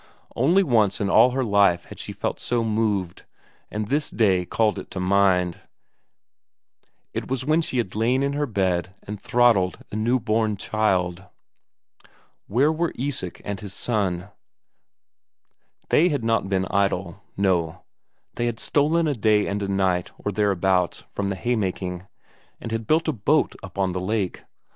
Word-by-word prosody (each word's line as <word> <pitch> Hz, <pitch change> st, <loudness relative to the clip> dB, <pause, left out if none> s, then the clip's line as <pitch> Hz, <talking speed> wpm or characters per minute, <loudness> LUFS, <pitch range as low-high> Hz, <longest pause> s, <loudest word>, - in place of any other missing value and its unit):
Only 170 Hz, +11 st, +4 dB
once 110 Hz, -, +2 dB
in 100 Hz, -1 st, 0 dB
all 125 Hz, -, +7 dB
her 130 Hz, +1 st, -1 dB
life 100 Hz, -5 st, +3 dB
before -, -, -22 dB
had -, -, -10 dB
she -, -, -6 dB
felt -, -, -3 dB
so 120 Hz, -1 st, 0 dB
moved, 105 Hz, -5 st, -1 dB, 0.5 s
and 105 Hz, 0 st, -3 dB
this 150 Hz, +5 st, 0 dB
day 95 Hz, -5 st, +2 dB
called 110 Hz, -3 st, +1 dB
it -, -, -10 dB
to -, -, -5 dB
mind; 90 Hz, -2 st, +2 dB, 1.5 s
it -, -, -4 dB
was 130 Hz, -1 st, -2 dB
when 155 Hz, +3 st, +3 dB
she 130 Hz, -, -3 dB
had 110 Hz, -6 st, -1 dB
lain 120 Hz, +5 st, +1 dB
in 140 Hz, 0 st, 0 dB
her 145 Hz, 0 st, -1 dB
bed 95 Hz, -4 st, -1 dB
and 105 Hz, -1 st, -7 dB
throttled 115 Hz, -7 st, +3 dB
a -, -, -5 dB
newborn 110 Hz, -2 st, +1 dB
child. 95 Hz, -4 st, 0 dB, 1.2 s
Where 135 Hz, +9 st, +3 dB
were 165 Hz, +1 st, -1 dB
Isak 125 Hz, -9 st, -4 dB
and 100 Hz, -1 st, -4 dB
his 100 Hz, -2 st, -8 dB
son? 100 Hz, -5 st, -1 dB, 1.6 s
They 175 Hz, +4 st, +4 dB
had 145 Hz, -7 st, -1 dB
not 115 Hz, -4 st, +1 dB
been 95 Hz, -1 st, +1 dB
idle; 100 Hz, -1 st, 0 dB, 0.2 s
no, 90 Hz, -5 st, 0 dB, 0.5 s
they 120 Hz, -, -1 dB
had 115 Hz, -1 st, -3 dB
stolen 155 Hz, +3 st, +2 dB
a 150 Hz, -, +1 dB
day 105 Hz, -3 st, +2 dB
and 100 Hz, +1 st, -2 dB
a 100 Hz, -, -2 dB
night 95 Hz, -2 st, 0 dB
or 105 Hz, -, -3 dB
thereabouts 95 Hz, -3 st, +1 dB
from 100 Hz, -, -2 dB
the 100 Hz, -, -2 dB
haymaking, 95 Hz, -5 st, -2 dB, 0.5 s
and 115 Hz, -, -7 dB
had 115 Hz, -1 st, -3 dB
built 160 Hz, +2 st, +2 dB
a 155 Hz, -, +1 dB
boat 140 Hz, +7 st, +1 dB
up 95 Hz, 0 st, -11 dB
on 95 Hz, -1 st, +1 dB
the 90 Hz, 0 st, -3 dB
lake. 95 Hz, -1 st, -2 dB
105 Hz, 160 wpm, -24 LUFS, 95-120 Hz, 1.6 s, all